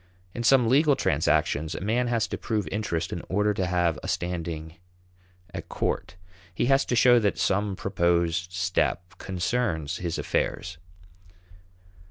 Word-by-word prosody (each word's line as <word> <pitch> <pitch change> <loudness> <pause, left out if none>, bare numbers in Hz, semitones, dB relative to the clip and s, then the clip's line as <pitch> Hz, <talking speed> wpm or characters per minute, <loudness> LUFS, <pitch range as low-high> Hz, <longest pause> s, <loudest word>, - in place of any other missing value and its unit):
In 120 - -4
some 125 0 +5
legal 140 +4 +4
transactions 80 - +1
a - - -4
man 115 +6 0
has 115 -2 +1
to - - -3
prove 105 -3 -2
"interest" 85 -5 -2
in 85 - -4
order 105 +2 +2
to 95 -2 -1
have 90 -2 +1
a - - -7
standing 85 -2 -3 0.8
at - - -7
court. 80 - -2 0.4
He - - +1
has 135 +2 +3
to 125 - -1
show 120 0 +6
that 105 -3 0
some 100 0 0
proposed 85 -2 0
step 90 0 -1
concerns 90 -4 -1
his 85 -2 -3
affairs. 90 -2 -2
90 Hz, 145 wpm, -26 LUFS, 85-115 Hz, 0.8 s, show